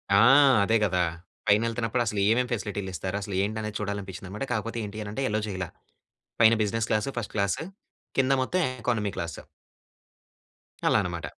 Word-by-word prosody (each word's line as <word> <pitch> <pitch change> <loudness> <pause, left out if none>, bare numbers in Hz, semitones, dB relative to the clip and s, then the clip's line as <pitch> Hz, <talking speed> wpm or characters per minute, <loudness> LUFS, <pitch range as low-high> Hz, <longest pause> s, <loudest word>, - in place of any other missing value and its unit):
ఆ! 100 - +7 0.4
అదే 110 +3 +3
గదా! 90 -3 +2 0.4
పైనెళ్తన్నప్పుడు 115 +3 +2
అసలు 105 -2 -1
ఏమేం 125 +2 +3
ఫెసిలిటీలిస్తారు, 100 -4 -3
అసలేంటనేది 105 +2 -2
చూడాలనిపిచ్చిందనమాట. 100 +1 -5
కాకపోతే 115 +1 -3
ఏంటీ 105 +1 -7
అనంటే, 110 +7 -3
యలో 105 -1 0
చేయల. 95 -3 -3 0.8
పైన 115 +1 +7
బిజినెస్ 110 +2 -1
క్లాసు, 110 +6 +1
ఫస్ట్ 110 - -5
క్లాసు. 100 +9 0 0.5
కింద 135 0 +4
మొత్తం 185 +8 0 0.2
ఎకానమీ 110 -5 0
క్లాసు. 85 -1 -5 1.5
అలా - - +4
అనమాట. 85 -1 -4
105 Hz, 130 wpm, -27 LUFS, 100-115 Hz, 1.5 s, ఆ